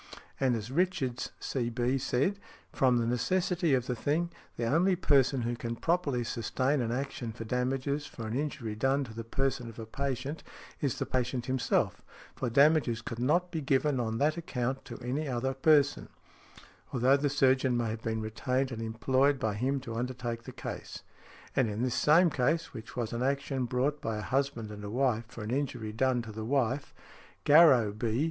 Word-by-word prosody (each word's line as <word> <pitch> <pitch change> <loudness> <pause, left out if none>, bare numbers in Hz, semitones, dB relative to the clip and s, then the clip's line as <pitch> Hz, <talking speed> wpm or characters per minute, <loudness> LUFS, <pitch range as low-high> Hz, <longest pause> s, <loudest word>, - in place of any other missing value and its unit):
And 130 -3 +2
as 115 +2 -5
Richards, 155 -6 0
C.B., 120 +1 -1
said: 140 +12 0 0.3
"From 125 -2 +3
the 115 - +1
necessity 170 +5 +1
of 125 -2 -1
the 125 - -2
thing, 160 +8 0 0.3
the 115 - -1
only 170 +9 +3
person 135 -6 +3
who 120 +1 -1
can 115 0 -4
properly 145 -4 0
sustain 130 +4 0
an 115 -1 -1
action 130 -2 -3
for 115 +1 -7
damages 135 +4 -1
for 115 - -8
an 110 +2 -3
injury 135 -6 -3
done 135 +6 +1
to 110 -4 -9
the 115 +1 -5
person 125 0 -1
of 115 - -12
a 115 - -6
patient, 140 +4 -3 0.4
is 140 -4 0
the - - -1
patient 125 -1 -1
himself, 130 -1 0 0.3
for 125 - -2
damages 140 -3 +4
could 115 - -5
not 170 +8 +2
be 160 - -2
given 135 0 +1
on 115 -2 -1
that 150 +6 +2
account 135 -5 -3
to - - -8
any 145 +5 -1
other 130 +1 -1
person, 145 +1 +3 0.8
although 130 +2 +4
the 145 +1 +1
surgeon 130 -2 +3
may 115 -2 0
have 110 0 -5
been 110 -1 -2
retained 125 +5 -1
and 115 -1 -5
employed 130 +5 +2
by 110 -5 -1
him 130 +6 0
to 120 -3 -6
undertake 120 -1 -3
the - - -7
case"; - - -7 0.5
and 130 -4 +3
in 105 +3 -2
this 125 -2 0
same 165 +3 +5
case, 155 +6 0
which 115 -2 -9
was 120 -1 -2
an 120 - -2
|75| 130 - +3
action 135 -2 -3
brought 130 +5 0
by 115 -1 -2
a - - -3
husband 130 -5 -1
and 105 0 -8
a 100 - -5
wife 120 -1 +1
for 115 -1 -8
an 105 - -4
injury 125 -5 -2
done 125 +1 +1
to 115 - -8
the 110 +1 -6
wife, 135 +2 0 0.5
Garrow, 145 -8 +7
B. 110 +2 -1
130 Hz, 190 wpm, -30 LUFS, 115-140 Hz, 0.8 s, Garrow